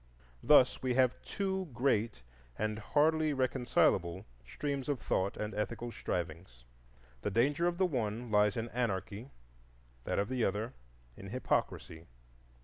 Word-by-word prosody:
Thus 130 -4 +5
we 130 -1 0
have 130 -1 +3
two 190 -2 -2
great 115 - +1 0.3
and 110 0 -1
hardly 155 +5 +2
reconcilable 120 -9 +1 0.2
streams 140 - -4
of 140 -4 0
thought 95 -1 -1
and 105 +1 -3
ethical 120 +3 -3
strivings; 85 - -5 0.6
the - - -1
danger 140 - +2
of 175 -1 -1
the 190 - +3
one 120 - -2
lies 105 0 +3
in 115 +1 -2
anarchy, 115 0 -3 0.8
that - - -1
of 100 - +1
the 130 -1 -1
other 110 +6 -1 0.4
in 95 - -10
hypocrisy. 85 -8 -2
120 Hz, 135 wpm, -33 LUFS, 105-135 Hz, 0.8 s, Thus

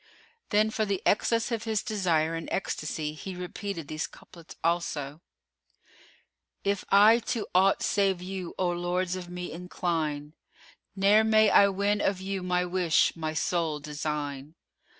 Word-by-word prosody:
Then 215 +1 +3
for 220 - 0
the 200 -3 -1
excess 230 +3 +2
of 230 -1 -2
his 220 -2 0
desire 175 -8 +1
and 165 0 -5
ecstasy 155 -4 -3
he 185 +5 -7
repeated 180 -2 -5
these 155 +1 -3
couplets 170 -2 -15
also:— 165 -3 -1 1.4
If 200 -1 0
I 210 +4 +7
to 230 -4 -1
aught 190 +2 +4
save 195 -2 +1
you, 185 -1 -6
O 185 -1 +1
lords 175 +1 -1
of 180 -1 -7
me, 180 0 -6
incline; 160 -4 -3 0.3
* - - -28
Ne'er 205 +3 +5
may 220 -1 +4
I 200 - +7
win 200 +1 0
of 195 -1 0
you 190 0 -3
my 180 0 0
wish, 175 -3 +2
my 155 -1 -4
sole 160 -2 0
design! 150 0 -4
180 Hz, 150 wpm, -28 LUFS, 160-200 Hz, 1.4 s, I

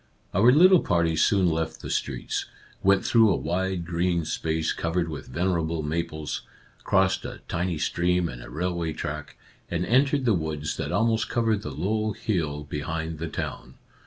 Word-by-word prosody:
'' - - -37
Our 115 +7 +6
little 180 +6 +7
party 85 - +1
soon 95 +3 +3
left 80 -1 -1
the - - -5
streets, - - -2 0.3
went 100 0 +3
through 115 -2 +5
a 95 - +3
wide 90 +1 -1
green 85 0 0
space 80 0 -1
covered 85 +1 -1
with 75 -4 -7
venerable 85 +1 -1
maples, 80 0 -3 0.4
crossed 95 0 +2
a - - -7
tiny 85 -1 -1
stream 90 +3 +1
and - - -8
a - - -10
railway 85 -1 -2
track, 75 0 -5 0.3
and 85 +1 -1
entered 135 +2 +3
the 115 - +4
woods 75 -3 -2
that - - -3
almost 115 -1 +1
covered 115 -3 +1
the 75 - -5
low 105 +9 -1
hill 75 -8 -2
behind 80 +2 -4
the 85 - -3
town. 65 -4 -5
85 Hz, 165 wpm, -26 LUFS, 80-95 Hz, 0.4 s, little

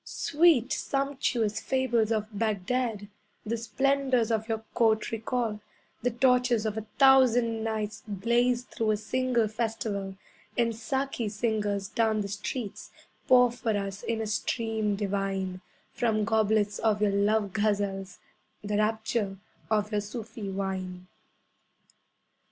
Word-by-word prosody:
Sweet, 300 -5 +3
sumptuous 265 -7 -1
fables 240 -3 +1
of 215 -2 +1
Baghdad 215 +1 -1 0.4
The 225 +2 -1
splendours 260 0 +1
of 220 0 -1
your 220 -1 -2
court 220 -2 +2
recall, 225 -1 -2 0.4
The 245 - +1
torches 250 -2 +2
of 215 -1 -1
a 220 0 -5
Thousand 245 -4 +5
Nights 215 -1 -3
Blaze 235 +5 +1
through 225 -3 -2
a 215 - +2
single 240 +1 0
festival; 215 -3 -3 0.4
And 230 -2 +2
Saki 245 0 -2
singers 210 -2 -1
down 220 -1 +1
the 200 - -4
streets, 210 +2 -5 0.4
Pour 250 -1 +6
for 230 -3 -1
us, 200 0 -4
in 225 -1 -2
a - - -2
stream 220 -1 -1
divine, 195 -2 -2 0.3
From 220 -3 +1
goblets 215 -1 +2
of 215 -2 +2
your 205 - +3
love 200 0 +1
ghazals 200 -2 -1 0.5
The 205 0 -1
rapture 215 -2 0 0.3
of 210 -1 +1
your 210 -1 +1
Sufi 210 -1 -6
wine. 190 -2 -4
220 Hz, 125 wpm, -28 LUFS, 205-240 Hz, 0.5 s, Pour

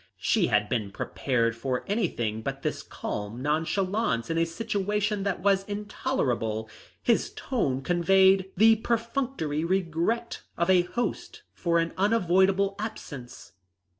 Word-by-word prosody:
She - - +2
had 105 0 +2
been 110 -5 -1
prepared 115 +3 -1
for 125 +2 -2
anything 120 - -1
but - - -5
this - - -2
calm 105 +3 -5
nonchalance 160 - 0
in 165 - 0
a 165 - +3
situation 205 +2 -1
that 195 -3 -2
was 195 0 +3
intolerable. 135 - -2 0.4
His 235 - +2
tone 135 - -1
conveyed 190 +3 +4
the 220 +2 +6
perfunctory 230 - -1
regret 185 +6 -1 0.2
of 170 +2 +2
a 180 -1 +6
host 235 +7 -4
for 170 -1 0
an 165 0 0
unavoidable 195 -1 +3
absence. 135 - -7
185 Hz, 125 wpm, -27 LUFS, 135-205 Hz, 0.4 s, the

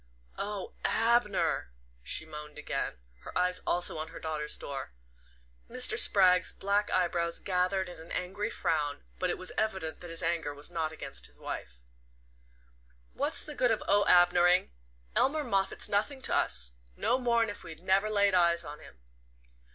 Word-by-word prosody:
"Oh, 205 -1 -4
Abner," 225 - +2 0.3
she 70 - -4
moaned 150 -1 -9
again, 150 - -3 0.2
her - - -7
eyes 180 0 +1
also 175 -2 +3
on 155 - -4
her 165 - -10
daughter's 155 -1 -2
door. 135 - -6 0.8
Mr. - - +3
Spragg's 180 -2 +5
black 200 +1 0
eyebrows 170 -2 +1
gathered 185 0 0
in 175 -2 -10
an 165 +1 -12
angry 190 +4 -2
frown, 150 -8 -2 0.2
but 185 - 0
it - - -1
was 185 - -5
evident 190 -7 -2
that 175 - -9
his 165 +1 -1
anger 165 -4 -1
was 145 +4 -3
not 160 -2 -2
against 160 - -3
his - - -19
wife. - - -6 1.4
"What's - - +1
the 300 - -7
good 255 -4 +2
of 225 - 0
Oh 205 0 +5
Abner 175 0 +6
ing? 180 +1 +3 0.4
Elmer 300 +3 +2
Moffatt's 195 -7 0
nothing 260 +7 0
to - - +1
us 60 0 +1 0.2
no 255 - +1
more'n 235 -3 +2
if 205 - -11
we 165 - -9
never 190 +5 +1
laid 200 -2 +3
eyes 170 -1 +3
on 150 -1 -9
him." - - -15
180 Hz, 165 wpm, -30 LUFS, 160-205 Hz, 1.4 s, Abner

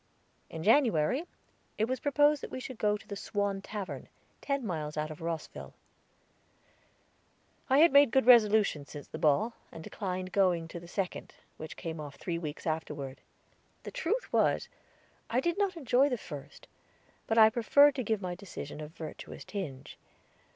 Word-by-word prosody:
In 160 -1 -6
January 235 - +3 0.5
it 215 - +2
was 255 0 -2
proposed 290 +1 +3
that - - -6
we - - -5
should 255 -2 -8
go 210 0 +2
to - - -18
the 200 - -5
Swan 200 0 -2
Tavern, 190 -10 -6 0.3
ten 280 -3 -1
miles 155 -5 -4
out 155 0 -2
of 155 +2 -10
Rosville. 165 -1 -5 1.9
I 265 - +5
had 315 -1 +6
made 280 -2 +7
good 265 0 +2
resolutions 215 - +5
since 145 -1 -9
the - - -8
ball, 200 +11 +2 0.2
and 160 - -9
declined 185 -1 -4
going 180 -4 +2
to 170 - -7
the 170 - -12
second, 185 +1 -4 0.2
which 155 - -8
came 165 -2 -5
off 145 -2 -7
three 170 -2 -3
weeks 155 -3 -6
afterward. 150 -4 -4 0.6
The - - -7
truth - - -2
was, - - +2 0.6
I 240 - +2
did 345 +7 -1
not 390 -3 0
enjoy 270 -1 +3
the 250 - -1
first; 145 -7 -10 0.6
but 225 - 0
I 220 -1 +8
preferred 285 +5 +5
to 260 - -3
give 220 -2 -1
my 180 -1 -2
decision 175 -5 -8
a 150 - -5
virtuous 160 0 -9
tinge. 145 -10 -6
200 Hz, 165 wpm, -30 LUFS, 160-250 Hz, 1.9 s, I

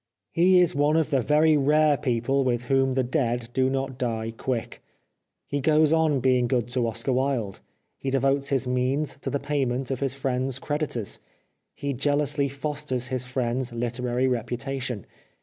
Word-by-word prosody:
He 180 +2 +5
is 175 -2 +3
one 145 +2 +2
of 160 -1 +1
the 135 -2 +3
very 155 +4 +4
rare 150 +1 +4
people 130 +1 0
with 125 -2 0
whom 135 +1 +1
the 130 - +2
dead 120 -3 -1
do 130 0 +2
not 135 -1 -3
die 115 -2 -2
quick. 120 0 -4 0.6
He 145 0 -2
goes 155 +2 +4
on 160 -4 +3
being 125 -1 +3
good 120 -2 0
to 125 -1 0
Oscar 120 +4 -1
Wilde. 125 -6 -1 0.4
He 135 - -3
devotes 135 +1 +1
his 135 -2 +1
means 130 +3 0
to - - -3
the 140 - -1
payment 135 -3 -1
of 130 - -2
his 135 -1 -1
friend's 130 -1 -1
creditors. 145 -7 -3 0.6
He 140 0 -3
jealously 145 +1 +1
fosters 140 -3 -3
his 130 -1 -2
friend's 125 0 -1
literary 120 +2 -1
reputation. 125 -1 -3
135 Hz, 165 wpm, -25 LUFS, 125-140 Hz, 0.6 s, He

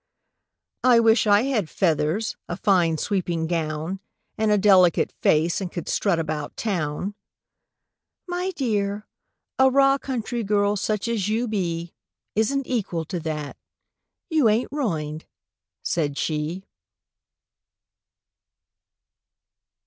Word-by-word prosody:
—"I 245 -2 +6
wish 225 -1 +4
I 205 +2 +5
had 235 - 0
feathers, 165 +3 0
a 175 - -3
fine 175 -6 +2
sweeping 175 -3 -1
gown, 160 +2 -2 0.4
And 220 0 0
a 210 - +4
delicate 190 -4 +4
face, 165 +5 +1
and 180 -2 -4
could 175 - -6
strut 195 -5 +1
about 155 -2 -4
Town!"— 185 -2 -2 1.1
"My 355 +1 -2
dear—a 210 +2 -1
raw 275 +1 +4
country 240 -3 -3
girl, 205 0 +2
such 210 +1 -1
as 215 -4 -1
you 230 +3 0
be, 170 -5 -3 0.4
Isn't 270 +6 +1
equal 190 -10 -2
to 180 +2 -4
that. 155 -3 -5 0.7
You 300 -8 +4
ain't 220 +4 +1
ruined," 160 - -3 0.6
said 145 -4 -1
she. 160 +5 -2
200 Hz, 110 wpm, -24 LUFS, 165-225 Hz, 1.1 s, I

